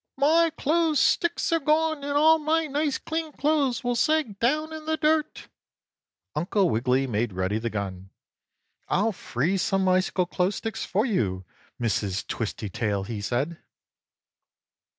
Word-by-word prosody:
"My 325 +4 +4
clothes 315 -1 +2
sticks 345 0 +2
are 330 - +3
gone 315 +2 +2
and 285 0 -1
all 320 +2 +6
my 320 +2 +1
nice 295 -1 -1
clean 320 -1 -4
clothes 285 -5 +1
will 245 0 0
sag 290 -6 +1
down 305 +6 0
in 315 -1 -8
the 315 0 0
dirt!" 305 0 0 0.9
Uncle 180 +4 +1
Wiggily 125 +4 +1
made 115 -3 -1
ready 95 +4 -1
the 115 +1 -2
gun. 95 -3 -5 0.8
"I'll 210 +4 +2
freeze 175 +5 -1
some 195 -2 +1
icicle 185 0 +2
clothes 180 +2 -1
sticks 225 0 -4
for 210 +5 0
you, 95 - -1 0.3
Mrs. 105 -3 -1
Twistytail," 105 -2 -3
he 105 0 -5
said. 135 +10 -2
210 Hz, 140 wpm, -26 LUFS, -, 0.9 s, all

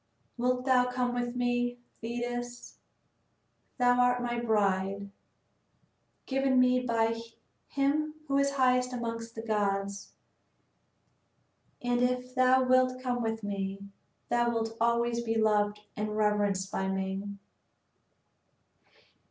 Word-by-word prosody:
Wilt 250 +1 0
thou 250 -2 +4
come 250 -1 -1
with 245 0 -2
me, 245 0 0 0.2
Thetis? 240 +1 -5 1.0
Thou 245 -1 +3
art 245 0 +3
my 240 0 -1
bride, 200 -3 0 1.1
given 270 -1 +2
me 255 0 +4
by 230 -2 0 0.5
him 300 +2 0
who 275 0 +2
is 280 0 +1
highest 250 -1 +2
amongst 230 -1 -4
the 225 - -6
gods, 200 -2 -1 1.7
and 245 0 +1
if 250 0 0
thou 255 0 +4
wilt 255 0 +3
come 250 -1 -2
with 225 -1 -2
me, 200 0 -4 0.4
thou 240 0 +2
wilt 225 -1 -2
always 235 0 +2
be 225 -1 -2
loved 210 -1 +2
and 210 0 -3
reverenced 205 -2 +1
by 190 - -1
me." 190 +1 -2
240 Hz, 110 wpm, -30 LUFS, 210-250 Hz, 1.7 s, thou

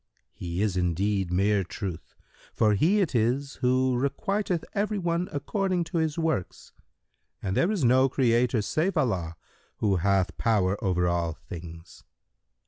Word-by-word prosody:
Q 90 - -6
"He 85 +3 -2
is 105 -4 0
indeed 90 +2 0
mere 100 +2 +2
Truth, 90 -2 -7 0.4
for 105 -1 +3
He 175 - +3
it 175 - 0
is 125 +4 0
who 130 0 +2
requiteth 175 - -1
every 210 +1 0
one 175 -1 -1
according 180 +5 -1
to 170 - +2
his 160 -1 -1
works, 160 - -2 0.7
and 95 -1 -3
there 170 - +2
is 205 -8 -1
no 130 +2 +4
Creator 120 -3 +2
save 170 - 0
Allah 95 - 0 0.4
who 100 -3 +1
hath 95 0 +1
power 100 -4 +1
over 90 -2 +1
all 85 -2 0
things. 85 0 -11
115 Hz, 145 wpm, -27 LUFS, -, 0.7 s, no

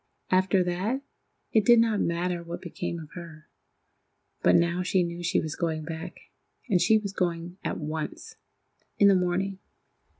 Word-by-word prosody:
After 185 0 +3
that, 195 +10 -1 0.5
it 220 - +4
did 235 +2 +7
not 225 -3 +2
matter 175 +1 -1
what 170 +1 -7
became 175 0 -4
of 155 -2 -11
her; 165 -3 -10 0.9
but - - +5
now 170 +1 +2
she 185 0 +2
knew 170 0 -5
she 175 0 +1
was 155 -1 -3
going 160 -2 -2
back, 165 +3 -7 0.5
and 185 -7 +3
she 220 - +5
was 200 -2 -4
going 175 0 -2
at - - -2
once—in 155 +5 -3
the 200 - +7
morning. 185 +1 0
175 Hz, 155 wpm, -27 LUFS, 170-195 Hz, 0.9 s, did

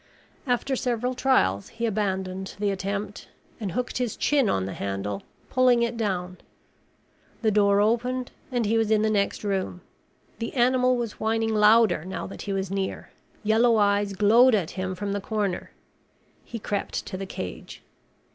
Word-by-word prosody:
After 245 +2 0
several 245 0 -1
trials, 245 - +2
he 235 - -3
abandoned 190 -3 -2
the 205 0 0
attempt 200 +1 -4 0.3
and 200 -6 -4
hooked 250 +3 -2
his 245 -4 -2
chin 280 -7 +2
on 95 - 0
the 95 - -5
handle, 100 0 -3 0.3
pulling 250 -2 +4
it 235 0 -1
down. 185 -5 -2 1.1
The 220 - +3
door 200 -1 +4
opened 245 +4 0 0.2
and 245 -3 0
he 225 +2 +2
was 220 -1 +1
in 215 -1 +3
the 220 - +2
next 200 0 0
room. 190 -3 -2 0.6
The 230 - -4
animal 255 0 +3
was 235 -3 -4
whining 225 0 0
louder 215 -3 +5
now 185 +1 -5
that - - -8
he 205 - -4
was 195 -1 -2
near. 195 -1 -3 0.3
Yellow 225 +2 +4
eyes 205 -1 +2
glowed 225 +5 +5
at 180 -6 -1
him 185 0 -3
from 200 +2 -3
the 200 0 -2
corner. 205 -3 -2 0.7
He 235 - -7
crept 205 -2 -3
to 190 - -6
the 195 0 -5
cage. 90 - -7
210 Hz, 165 wpm, -26 LUFS, 195-235 Hz, 1.1 s, louder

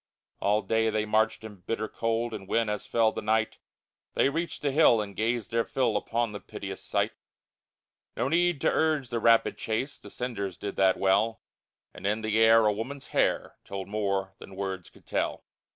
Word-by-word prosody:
All 105 +2 +2
day 110 0 +2
they 110 0 0
marched 110 +1 +1
in 105 -2 -9
bitter 110 +4 -3
cold, 115 +1 -1
And 100 -3 -7
when, 115 +1 +1
as 105 -1 -3
fell 115 -1 +3
the - - -5
night, 110 +1 0 0.6
They - - +4
reached 165 +3 -3
the 145 - +2
hill 135 -5 +5
and 100 -2 -4
gazed 115 0 -1
their 115 0 +2
fill 120 -4 0
Upon 115 +2 0
the 105 - -6
piteous - - -7
sight, - - 0 1.1
No 120 - +1
need 175 +1 +2
to - - +3
urge 155 -5 +1
the 120 - -1
rapid 115 0 +4
chase, 115 +6 -2
The - - -12
cinders 100 -7 -4
did 100 - -5
that 95 -1 +4
well, 100 +4 +2 0.5
And - - -5
in 105 +2 0
the 110 0 +1
air 115 0 +6
a 105 - +4
woman's 130 +6 -6
hair - - 0
Told 95 -1 -6
more 100 -2 -1
than 95 - -11
words 95 -2 -4
could - - -21
tell. - - -2
110 Hz, 190 wpm, -28 LUFS, 105-115 Hz, 1.1 s, air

